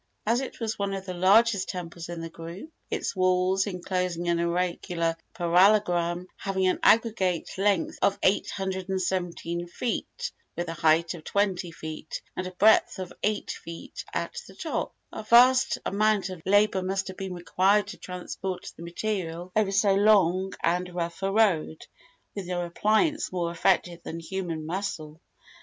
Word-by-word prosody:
As 235 +4 +2
it 265 - -7
was 225 -2 -3
one 200 -1 -1
of 190 0 -6
the 185 - -4
largest 200 +3 +4
temples 170 -2 -6
in 170 -1 -5
the 165 - -5
group 170 - -9 0.2
its - - -2
walls, 185 +1 +2
enclosing 180 -2 -2
an 170 0 +2
irregular 170 -1 -1 0.2
parallelogram, 175 -1 +3
having 190 -1 -1
an 185 - +2
aggregate 210 -7 +3
length 195 -3 +1
of 200 0 +3
817 185 -3 -1
feet, 250 - -3 0.2
with 175 0 -3
a - - -3
height 160 +1 +3
of 165 -3 -10
20 190 -2 0
feet, 155 -1 -7 0.2
and 185 - -3
a - - -6
breadth 215 +4 +4
of 185 -2 -6
8 210 0 -1
feet 165 0 -8
at 480 - -3
the - - -14
top - - -3 0.2
a - - -5
vast 250 +4 +5
amount 205 -2 +1
of 180 -3 -8
labor 205 -1 +4
must 190 +1 -2
have 190 - -8
been 190 -2 -5
required 190 +4 +2
to - - -8
transport 180 0 -6
the - - -13
material 175 -1 -3
over 215 -2 +2
so 195 0 +3
long 195 -2 +4
and 180 +1 0
rough 170 +1 -3
a 195 0 0
road, 195 -7 +2 0.5
with 200 -3 -6
no 175 -1 -2
appliance 220 - +1
more 175 -2 -1
effective 175 0 +1
than 165 - -6
human 165 -2 -4
muscle. 165 -3 -4
185 Hz, 155 wpm, -27 LUFS, 170-200 Hz, 0.5 s, vast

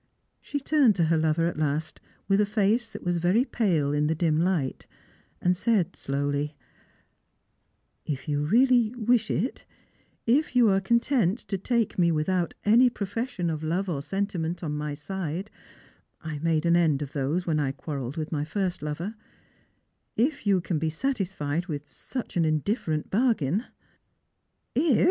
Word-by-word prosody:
She 290 - -3
turned 275 -6 +4
to 170 - +2
her 165 0 +3
lover 160 +1 +2
at 170 -2 -2
last, 155 +1 -2 0.3
with 195 +1 +4
a - - +3
face 215 +3 +1
that - - -8
was 175 -1 0
very 185 +9 +3
pale 165 - +1
in 150 0 +2
the 160 - +1
dim 160 -1 +1
light, 170 -6 0 0.5
and 180 0 +2
said 190 -3 +1
slowly, 145 +2 -2 0.8
" - - -47 0.3
If 145 0 -4
you 145 -1 0
really 240 - +4
wish 235 -1 +2
it, 255 - -1 0.6
if 260 +4 +2
you 240 -3 +6
are 195 0 +3
content 235 -1 +2
to 195 - 0
take 230 -1 0
me 170 -1 +4
without 170 +3 0
any 235 +5 +6
profession 205 -4 -3
of 155 -1 -4
love 180 +5 -1
or 145 -5 -2
sentiment 175 0 -2
on 150 -2 -2
my 150 0 -3
side 185 +4 -4 0.4
— - - -37
I 155 -2 -4
made 160 0 +1
an 170 0 +4
end 155 -5 +3
of 145 - -9
those 150 +6 -1
when 155 -3 +1
I 140 -3 0
quarrelled 135 -1 -5
with 155 -1 -3
my 150 -2 -1
first 180 +3 -2
lover 150 +7 -4 0.6
— - - -47
if 290 -8 -8
you 195 -3 +4
can 165 -2 -1
be 160 +1 0
satisfied 175 - -2
with 145 -4 -4
such 255 -3 -6
an 170 - +3
indifferent 155 - -1
bargain 215 - +1 0.4
" - - -49
" - - -50
If!" 280 -2 +3
175 Hz, 170 wpm, -27 LUFS, 155-215 Hz, 0.8 s, you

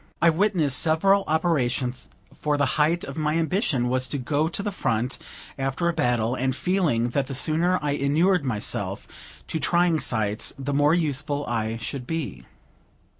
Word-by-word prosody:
I 170 0 +5
witnessed 160 -7 +2
several 195 +5 +3
operations; 130 -6 0 0.2
for 150 -1 -1
the 145 - +2 0.2
height 170 +5 +2
of 165 - -6
my 150 0 0
ambition 160 - +1
was 130 +1 0
to 145 - -2
go 145 +4 0
to 175 +4 -3
the 205 - -2
front 125 - -1 0.4
after 135 +6 -1
a 170 - +1
battle, 120 -4 +1
and 130 0 -1
feeling 155 -10 +1
that 135 +2 -1
the 135 - -5
sooner 165 +6 +2
I 145 - 0
inured 155 +6 +2
myself 115 -6 -3 0.4
to 160 - -3
trying 170 +1 +2
sights, 110 -5 0
the 140 +1 -3
more 145 +3 +4
useful 145 -3 -1
I 115 -1 -2
should 125 +1 -5
be. 160 -4 -4
145 Hz, 165 wpm, -24 LUFS, 130-165 Hz, 0.4 s, I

